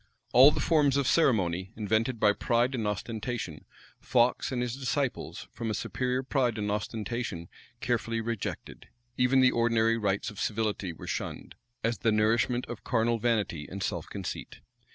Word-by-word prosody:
All 130 +4 +9
the 150 - -2
forms 145 -4 +3
of 140 - +1
ceremony, 95 - +2
invented 110 +3 0
by 105 -1 +5
pride 120 +4 +1
and 115 -5 -1
ostentation, 105 - -4 0.3
Fox 125 +1 +2
and 125 - -1
his 120 -1 -3
disciples, 135 0 -2
from 115 - -4
a 110 - -1
superior 125 +4 -1
pride 125 -4 0
and 105 -1 -1
ostentation, 105 -4 -3 0.3
carefully 115 -1 -1
rejected: 115 -2 -5 0.3
even 130 +2 +4
the 130 -1 +6
ordinary 115 -1 +2
rites 100 -1 -1
of 105 - -11
civility 105 -4 -1
were 80 - -10
shunned, - - -5 0.3
as 115 +1 0
the 115 - +2
nourishment 115 +3 +2
of - - -8
carnal 115 -1 +1
vanity 105 -10 0
and 95 +1 -5
self - - -3
conceit. - - -6
115 Hz, 155 wpm, -29 LUFS, 105-125 Hz, 0.3 s, All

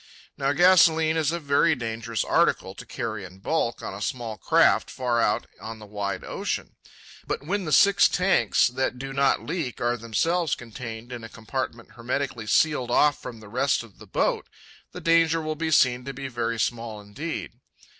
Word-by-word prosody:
Now 135 0 0
gasolene 160 -1 +5
is 155 -2 +1
a 170 - -2
very 150 +2 +3
dangerous 115 -3 -3
article - - +1
to - - -11
carry 110 -3 -4
in 90 0 -11
bulk 120 +3 -1
on - - -5
a 100 - -8
small 120 -3 -3
craft - - +3
far 125 -2 0
out 105 -1 +1 0.2
on 110 0 -7
the 110 - -11
wide 100 -2 -4
ocean. - - -4 0.5
But - - -3
when 195 +3 -1
the 155 - -3
six 200 +7 +6
tanks 185 +1 +3
that 125 0 -2
do 135 +1 -6
not 140 0 +2
leak 155 -7 -3
are 120 +1 0
themselves 155 +9 0
contained 115 0 -8
in 120 -2 -7
a 115 - -8
compartment 115 0 -5
hermetically 120 0 -3
sealed 140 -2 +2
off 145 +4 +3
from 115 -2 -8
the 110 - -12
rest 125 +4 +1
of 115 -4 -17
the - - -13
boat, - - 0 0.4
the - - -8
danger 165 -1 +3
will 155 -1 -2
be 160 +1 -2
seen 125 -5 +3
to 135 -1 -6
be 135 +1 -5
very 115 -2 -2
small 115 -2 -2
indeed. 105 +11 -6
125 Hz, 185 wpm, -25 LUFS, 115-155 Hz, 0.5 s, six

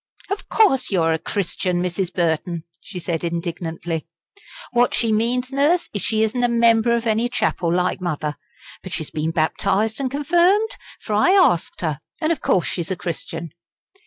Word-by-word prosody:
"Of 400 - -4
course 270 - +3
you're 165 -4 +2
a 160 - -1
Christian, 180 0 -1
Mrs. 180 0 -2
Burton," 170 -1 -1 0.2
she 190 - -9
said 170 -2 -3
indignantly. 170 -1 -3 0.6
"What 245 0 +3
she 230 -2 +1
means, 245 +4 0
Nurse, 295 +6 +2
is 205 - -3
she 220 -1 +1
isn't 245 +3 0
a - - +5
'member' 235 0 +4
of 235 0 -2
any 225 +2 +1
chapel, 180 -8 0
like 180 +1 0
mother. 150 -4 -2 0.5
But 185 - -7
she's 155 -3 -3
been 155 +1 -1
baptised 190 - 0
and 270 -2 -1
confirmed, 350 - +3 0.3
for 215 - -5
I 215 - +4
asked 360 - +3
her. 155 -4 -2 0.2
And 310 +1 +1
of 325 - -1
course 180 - +2
she's 170 -3 -2
a 185 - -1
Christian." 165 -2 -5
195 Hz, 170 wpm, -21 LUFS, 170-245 Hz, 0.6 s, a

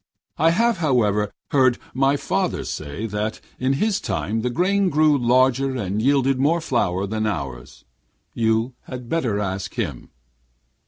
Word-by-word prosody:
I 160 +2 +5
have, 230 +6 +2
however, 105 - +1 0.2
heard 130 -3 +4 0.2
my 135 +2 +2
father - - -1
say 75 +8 -5
that 105 0 -3 0.2
in 130 +2 +1
his 205 +8 +1
time 110 +1 -2
the 125 - -1
grain 190 +7 +2
grew 155 -1 +4
larger 130 +1 +2
and 105 -2 -2
yielded 135 0 +2
more 155 +5 +3
flour 100 - 0
than 110 +2 -2
ours. 70 - -5 0.5
You 115 +2 +1
had 125 -2 -8
better 120 -11 0
ask 95 -1 -3
him.' 85 - -4
125 Hz, 145 wpm, -22 LUFS, 105-140 Hz, 0.5 s, I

